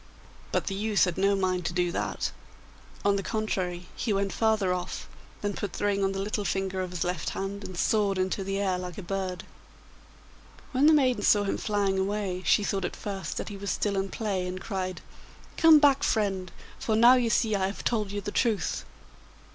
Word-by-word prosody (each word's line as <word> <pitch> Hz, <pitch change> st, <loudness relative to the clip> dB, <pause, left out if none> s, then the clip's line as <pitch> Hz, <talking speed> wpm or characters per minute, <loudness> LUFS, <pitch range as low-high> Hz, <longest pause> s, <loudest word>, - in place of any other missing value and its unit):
But -, -, 0 dB
the 195 Hz, -, -2 dB
youth 210 Hz, +1 st, +2 dB
had 180 Hz, -2 st, -2 dB
no 200 Hz, +1 st, +3 dB
mind 185 Hz, -2 st, 0 dB
to -, -, -3 dB
do 175 Hz, -1 st, +1 dB
that; -, -, -2 dB, 0.7 s
on 200 Hz, 0 st, +4 dB
the -, -, -1 dB
contrary, 185 Hz, -5 st, -2 dB
he 230 Hz, -, -2 dB
went 195 Hz, -1 st, 0 dB
farther 215 Hz, -5 st, +2 dB
off, 180 Hz, 0 st, -4 dB, 0.4 s
then 205 Hz, 0 st, 0 dB
put 200 Hz, -1 st, -4 dB
the -, -, -2 dB
ring 200 Hz, -1 st, +1 dB
on 195 Hz, -, +2 dB
the 195 Hz, -, -3 dB
little 210 Hz, 0 st, -2 dB
finger 195 Hz, -1 st, -1 dB
of 185 Hz, -, -3 dB
his 180 Hz, -1 st, -2 dB
left 175 Hz, -3 st, -2 dB
hand, 200 Hz, +1 st, -4 dB
and 185 Hz, -2 st, -7 dB
soared 205 Hz, -1 st, +2 dB
into 185 Hz, +1 st, -1 dB
the 195 Hz, +1 st, -2 dB
air 190 Hz, -2 st, 0 dB
like 180 Hz, -2 st, -6 dB
a 200 Hz, -, -6 dB
bird. 185 Hz, -1 st, -3 dB, 1.3 s
When 270 Hz, +2 st, +4 dB
the -, -, +8 dB
maiden 255 Hz, -7 st, +3 dB
saw 205 Hz, 0 st, +4 dB
him 200 Hz, -, -1 dB
flying 200 Hz, -3 st, 0 dB
away 195 Hz, -2 st, -1 dB
she 210 Hz, -, +4 dB
thought 195 Hz, -1 st, -1 dB
at -, -, -3 dB
first 195 Hz, -2 st, -5 dB
that -, -, -4 dB
he 205 Hz, -, -7 dB
was 200 Hz, 0 st, -5 dB
still 200 Hz, +3 st, 0 dB
in 195 Hz, 0 st, -1 dB
play, 195 Hz, -5 st, -2 dB
and 185 Hz, +1 st, -4 dB
cried, 185 Hz, -3 st, -4 dB, 0.5 s
'Come 325 Hz, -1 st, +8 dB
back, 285 Hz, -2 st, +5 dB
friend, 195 Hz, -5 st, 0 dB, 0.3 s
for 220 Hz, -, 0 dB
now 235 Hz, +3 st, +8 dB
you 245 Hz, -2 st, +2 dB
see 220 Hz, -1 st, +2 dB
I 190 Hz, -1 st, +1 dB
have 200 Hz, -, -6 dB
told 215 Hz, -4 st, 0 dB
you 205 Hz, 0 st, -3 dB
the 205 Hz, -, -4 dB
truth. 225 Hz, -4 st, 0 dB
195 Hz, 210 wpm, -28 LUFS, 185-210 Hz, 1.3 s, the